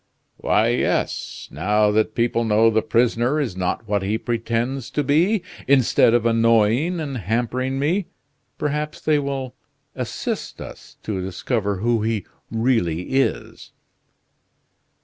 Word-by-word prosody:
"Why, 110 +2 +2
yes. 120 - -1
Now 105 +1 +2
that 110 +1 +1
people 115 0 +1
know 110 +1 +4
the 110 0 +2
prisoner 120 +5 +1
is 125 -11 -2
not 95 +4 -2
what 100 -1 0
he 100 +3 -1
pretends 120 +2 -2
to 150 - -1
be, 175 +9 +2 0.2
instead 130 -3 +4
of 120 -1 +1
annoying 115 +8 +3
and 140 -4 -4
hampering 120 +6 -1
me, 165 +7 0 0.5
perhaps 150 +1 -2
they 155 -1 +2
will 135 -2 -4 0.4
assist - - -4
us - - -11
to 100 -4 -3
discover 100 +2 -2
who 115 0 +1
he 110 -3 -1 0.2
really 110 -8 0
is." 135 0 -1
115 Hz, 130 wpm, -22 LUFS, 110-135 Hz, 0.5 s, know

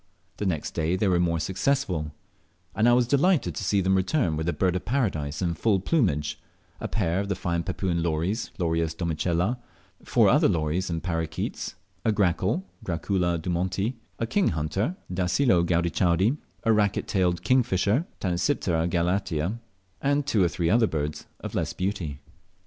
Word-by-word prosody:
The 105 - -1
next 80 -5 -2
day 80 +2 0
they 100 +2 +1
were 90 -2 +3
more 85 -2 +1
successful, 95 - 0 0.6
and 110 +3 +3
I - - +6
was 125 0 +4
delighted 140 - +2
to 90 - -4
see 100 +1 +2
them 95 +1 +2
return 95 - +1
with 80 +2 -1
a - - +2
Bird 90 0 +1
of 90 - -2
Paradise 95 - -1
in 85 -1 +1
full 100 +4 +2
plumage, 90 - 0 0.4
a - - -3
pair 90 -5 0
of 100 0 -3
the 100 - 0
fine 85 -2 -1
Papuan 90 -1 -1
lories 85 +7 -1
(Lorius 80 -3 0
domicella), 85 +6 0 0.4
four - - +4
other - - +5
lories 80 +3 0
and 80 -1 -3
parroquets, 80 -3 -3 0.3
a 110 - +3
grackle 100 - +1 0.2
(Gracula 90 -1 0
dumonti), 95 +6 -1 0.2
a 115 - -1
king 195 - +1
hunter 95 - -1 0.2
(Dacelo 90 +2 +3
gaudichaudi), 85 - +2 0.3
a 115 - +4
racquet 105 -2 +1
tailed 90 -3 +1
kingfisher 120 - +2
(Tanysiptera 85 - 0
galatea), 90 +2 0 0.4
and 140 +1 +1
two 105 -7 +2
or - - +4
three 85 0 0
other 115 0 +4
birds 75 -3 -3
of - - -6
less - - -1
beauty. 90 -7 -3
90 Hz, 160 wpm, -26 LUFS, 85-105 Hz, 0.6 s, I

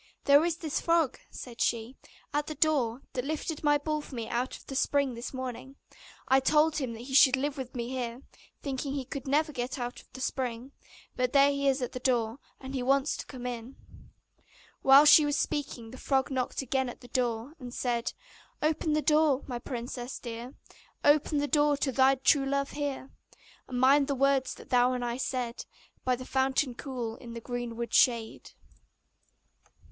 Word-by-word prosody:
'There 285 +2 +6
is 340 -1 0
a - - -19
nasty 300 - -2
frog,' 330 -5 +2
said 240 -2 -9
she, 235 +2 0 0.4
'at 295 0 0
the 310 - -5
door, 275 -5 +1
that 250 - -2
lifted 310 +2 -4
my 295 -1 +4
ball 305 +1 -2
for 285 - -10
me 230 -2 -4
out 245 +2 -2
of - - -19
the 270 - -7
spring 280 -1 +1
this 235 +1 -6
morning: 260 +1 -6 0.5
I 265 +1 +5
told 305 +3 +3
him 260 -6 -2
that 230 +1 -8
he 265 +1 -8
should 265 -1 +7
live 285 +2 -2
with 260 -3 -7
me 235 -1 -3
here, 250 0 -4 0.4
thinking 275 0 -3
that - - -2
he 265 - -4
could 275 +1 -6
never 305 +3 +2
get 250 -1 -4
out 245 -1 -5
of - - -28
the 260 - -9
spring; 255 -1 -3 0.4
but 250 -1 0
there 280 0 +6
he 280 0 -1
is 270 -1 +2
at 245 - -3
the 255 - -5
door, 240 -1 0 0.2
and 265 0 -8
he 265 - -2
wants 275 +3 +2
to - - -7
come 250 -3 -8
in.' 245 +1 -5 1.1
While 270 +2 +8
she 300 +1 +9
was 290 0 0
speaking 250 -6 -3
the 255 - -10
frog 270 0 0
knocked 260 0 -2
again 265 0 0
at - - -10
the 245 - -12
door, 245 +1 -1
and 250 -2 -8
said: 240 -1 -1 0.5
'Open 310 0 +1
the 305 0 +1
door, 300 -3 +3
my 245 -3 -4
princess 245 0 -5
dear, 235 +2 -7 0.5
Open 295 +1 +4
the 290 0 +1
door 295 -1 +3
to 275 -1 0
thy 265 +1 +4
true 270 +1 +3
love 280 0 -1
here! 285 -2 -4 0.6
And 250 -1 -3
mind 275 +2 +5
the 280 - 0
words 270 0 +2
that - - -15
thou 250 0 +4
and 245 -1 -2
I 240 0 -2
said 250 -3 -3 0.4
By 255 -1 +2
the 255 +1 -9
fountain 265 0 +1
cool, 240 -3 -5
in 235 -2 -10
the - - -4
greenwood 235 -1 -5
shade. 230 -3 +2
265 Hz, 200 wpm, -29 LUFS, 245-285 Hz, 1.1 s, she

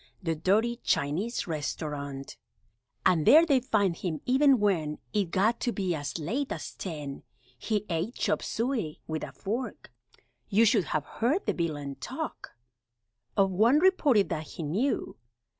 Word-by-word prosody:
The 165 -2 0
dirty 210 +9 +1
Chinese 190 - -1
Restaurant, 145 -3 -4 0.7
And 165 -4 +4
there 320 +3 +8
they'd 275 -6 +3
find 200 -8 +1
him, 165 -3 -3
even 265 0 +4
when 165 -8 +1 0.2
It 205 -2 +2
got 210 +7 +2
to 240 - 0
be 190 -5 -1
as 145 -1 -4
late 235 - -2
as - - -5
ten! 150 -6 -6 0.3
He 210 - -2
ate 175 +8 -2
chopped - - 0
suey 230 - -2
(with 155 0 -4
a - - -6
fork), 235 +6 -5 0.6
You 220 +3 +5
should 210 -4 +3
have 150 +1 -2
heard 280 - 0
the - - +1
villain 145 -5 -3
talk 125 - -6 0.8
Of 195 -1 +4
one 225 +9 +4
reporter 305 - +4
that 160 -5 -4
he 165 - -7
knew 205 - -1
195 Hz, 150 wpm, -28 LUFS, 155-235 Hz, 0.8 s, there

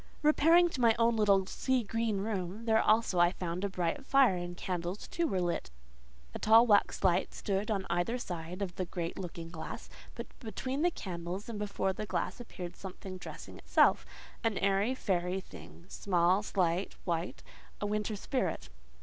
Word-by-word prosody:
Repairing 325 +3 +6
to 290 -7 -4
my 230 -2 +5
own 230 0 +3
little 200 -3 +4
sea 260 +4 0
green 220 -1 -1
room, 200 0 -3
there 220 -1 +4
also 215 -5 +3
I 175 +1 +5
found 180 0 -4
a 200 - 0
bright 180 +6 -2
fire, 270 -7 +4
and 175 0 -5
candles 180 +2 -4
too 340 -1 0
were 190 - 0
lit: 175 - -1 0.6
a - - -5
tall 225 +2 +7
waxlight 190 -4 +2
stood 200 +1 -2
on 195 -3 -1
each 230 +8 0
side 175 -4 -5
the 185 -2 -3
great 170 0 -4
looking 170 -2 -6
glass; 160 -2 -7 0.2
but - - -5
between 255 +5 -4
the 350 - +4
candles, 180 - -5
and 220 -3 -5
before 200 -2 -1
the 210 +3 -5
glass, - - -2
appeared 180 -7 -7
something 190 0 -8
dressing - - -9
itself—an 225 -3 +1
airy, 200 +5 +2
fairy 180 -5 -1
thing—small, 180 0 -1
slight, 185 -3 0
white—a 170 +4 -5
winter 210 +1 -1
spirit. 195 - -2
195 Hz, 160 wpm, -32 LUFS, 180-225 Hz, 0.6 s, tall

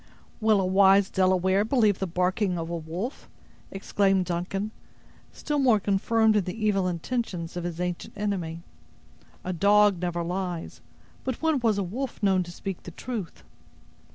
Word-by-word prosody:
"Will 215 -2 +3
a 190 - +1
wise 195 +1 +5
Delaware 185 +1 +2
believe 215 -4 +2
the 190 - -1
barking 180 +2 0
of 165 0 -4
a - - -2
wolf?" 170 - -5 0.4
exclaimed 195 -1 +1
Duncan, 190 +4 -3 0.6
still 295 -1 -2
more 245 -6 +4
confirmed 215 +3 +2
in 205 -4 +2
the 215 +4 -4
evil 195 -3 +2
intentions 180 -1 -3
of 175 -1 -4
his 175 -1 -4
ancient 180 +2 -4
enemy: 180 -5 -3 0.8
"a 185 - -3
dog 205 +1 +4
never 175 -1 -1
lies, 180 -1 -4 0.4
but 260 -3 -3
when 320 -3 +1
was 225 -4 +2
a 200 - 0
wolf 235 +6 -5
known 190 -2 +3
to 175 -1 -6
speak 190 +1 -6
the - - -9
truth?" 205 0 -6
195 Hz, 155 wpm, -26 LUFS, 180-210 Hz, 0.8 s, wise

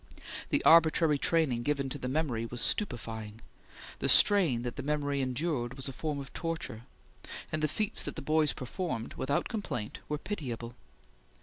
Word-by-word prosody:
The - - +1
arbitrary 160 -2 +5
training 150 -8 +2
given 140 +1 0
to 145 - -5
the 125 - -4
memory 130 -5 -1
was 120 +1 -6
stupefying; 110 - -1 0.6
the - - 0
strain 170 - +6
that 120 -1 -4
the 140 - -4
memory 145 -1 -1
endured 130 -1 -1
was 135 0 -2
a - - -4
form 150 +3 -3
of 135 -1 -8
torture; 165 -9 -4 0.7
and 155 - -1
the 155 - +3
feats 210 +7 0
that - - -4
the - - -5
boys 155 0 +3
performed, 130 -3 -4
without 140 +2 -1
complaint, 200 - -4
were 150 - -1
pitiable. 120 - -5
140 Hz, 165 wpm, -31 LUFS, 120-160 Hz, 0.7 s, strain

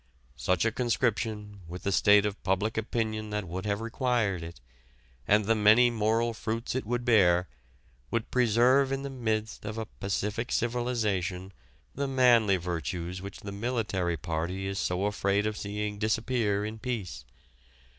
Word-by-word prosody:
such 85 - +1
a 115 - +2
conscription, 110 -3 -1
with 90 +2 -8
the 100 - 0
state 105 +2 +5
of 105 -1 -3
public 95 +4 0
opinion 110 -1 -2
that 105 -3 -3
would 95 +4 -5
have 100 +1 -1
required 115 -5 0
it, 80 -3 -9 0.7
and 105 0 +4
the 115 - +3
many 110 +3 +5
moral 115 +1 +1
fruits 115 +1 -3
it 130 -4 -3
would 120 +1 -1
bear, 90 -7 +4 0.6
would 115 - -2
preserve 125 +3 +4
in 135 0 -2
the 140 - -5
midst 110 -4 -2
of 105 +1 -5
a 110 - -3
pacific 105 +3 -3
civilization 105 -6 -1 0.4
the 140 +1 -2
manly 120 -7 +4
virtues 85 +1 -4
which 100 +1 -8
the 100 - -6
military 100 -6 -1
party 85 +5 -3
is 95 0 -3
so 90 +2 0
afraid 100 0 +1
of 110 0 -1
seeing 105 0 -4
disappear 110 -1 0
in 110 +1 -6
peace.... 100 - -4
105 Hz, 155 wpm, -29 LUFS, 95-115 Hz, 0.7 s, state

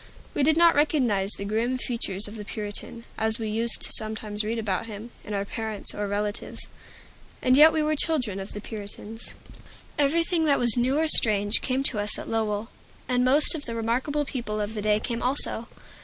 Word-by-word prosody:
We - - -1
did 310 +3 +3
not 340 0 +6
recognize 250 -10 +1
the 200 - -7
grim 230 +5 -1
features 220 -6 -3
of 205 - -10
the 210 - -7
Puritan, 210 +2 -5 0.2
as 220 0 +2
we 220 -3 -4
used 230 +2 -1
sometimes 215 -1 -2
to 210 - -4
read 230 +2 -2
about 215 -1 -2
him, 220 +2 -9
in 210 - -5
our 200 0 -2
parents 220 -1 -2
or 205 0 -3
relatives. 205 +1 -4 0.7
And 255 0 +3
yet 305 +3 +8
we 315 -1 0
were 305 0 0
children 255 - 0
of 195 - -7
the 210 - -7
Puritans. 215 +1 -5 0.6
Everything 330 +3 +2
that 285 -2 +3
was 240 -2 +7
new 255 +3 +1
or 320 +1 +1
strange 205 -6 +6
came 260 +1 -1
to 235 -5 +2
us 205 0 0
at - - -8
Lowell. 220 -1 -2 0.4
And 250 0 +1
most 280 +4 +3
of 310 -3 -5
the 230 - -5
remarkable 255 +6 -1
people 230 -6 -4
of 210 +1 -3
the 215 - -4
day 210 0 +2
came 235 +1 -4
also. 250 -3 -1
225 Hz, 200 wpm, -25 LUFS, 210-265 Hz, 0.7 s, yet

